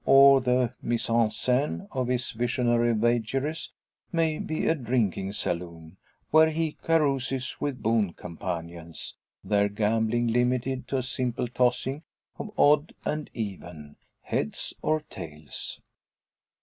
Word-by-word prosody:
Or 135 0 +8
the 125 -1 +2
mise 120 0 -1
en 115 -1 +4
scene 130 - 0
of 130 -2 -1
his 125 -1 -1
visionary 120 0 +1
vagaries 120 +7 0 0.4
may 160 -2 +1
be 155 - -2
a - - +4
drinking 115 - -1
saloon, 85 -3 -4 0.3
where 160 +1 +7
he 160 0 -1
carouses 135 -5 +1
with 130 -6 -2
boon 110 -5 +2
companions, 85 -2 -6 0.3
their 100 -1 +2
gambling 110 +3 +1
limited 125 +2 0
to 135 - -1
a 130 - -1
simple 125 -1 -1
tossing 125 +3 +1 0.4
of - - -4
odd 150 +2 +4
and 150 0 -2
even, 90 -9 -6 0.3
"heads - - -2
or 155 0 +1
tails." 75 - -7
120 Hz, 125 wpm, -27 LUFS, 105-135 Hz, 0.4 s, Or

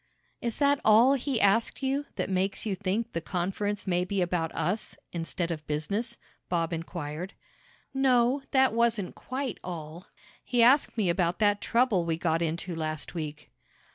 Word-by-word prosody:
"Is 235 -2 -2
that 285 -1 +3
all 225 +5 +6
he 270 -2 0
asked 225 +7 +2
you 275 +2 0
that - - -1
makes 190 +2 -1
you 210 - 0
think 205 +4 -2
the 165 - -2
conference 195 +4 -2
may 180 -2 +1
be 195 +2 -2
about 175 -2 0
us, 205 +5 -1
instead 170 0 -3
of 155 -2 -5
business?" 155 +10 -2 0.3
Bob 170 -1 0
inquired. 165 +1 -5 0.6
"No, 260 0 +3
that 265 -3 +4
wasn't 230 -4 +1
quite 260 -3 -4
all. 170 0 -7 0.4
He 240 -2 +2
asked 260 +1 +4
me 210 -4 +2
about 175 0 +1
that 205 -1 +2
trouble 230 -6 +2
we 165 -1 -1
got 165 -1 0
into 170 +2 -2
last 155 -1 -4
week." 150 -3 -6
195 Hz, 160 wpm, -28 LUFS, 170-235 Hz, 0.6 s, all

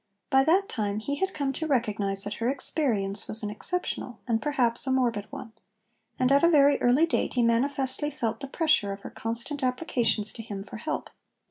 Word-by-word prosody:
By 265 0 +5
that 375 +5 +3
time 205 -3 -2
he 280 +7 -3
had 380 +5 -1
come 280 -5 -2
to 315 +4 -4
recognise 205 -7 0
that 205 - -3
her 235 - +1
experience 225 -8 -1
was 220 - +2
an 210 - -2
exceptional 250 0 -3
and, 225 -2 +1
perhaps, 255 -4 +3
a - - +1
morbid 235 -6 0
one; 265 -5 -9 0.6
and 255 +1 +2
at 280 +2 +4
a 340 - +6
very 285 -3 +4
early 255 +7 +4
date 330 - -1
he 245 - +3
manifestly 265 +4 +1
felt 225 -6 -3
the 275 - -6
pressure 275 - +1
of 195 - -10
her - - -9
constant 235 +6 -3
applications 250 -5 0
to - - -7
him 200 -3 -6
for 210 - -9
help. 310 +8 -4
250 Hz, 200 wpm, -27 LUFS, 220-285 Hz, 0.6 s, a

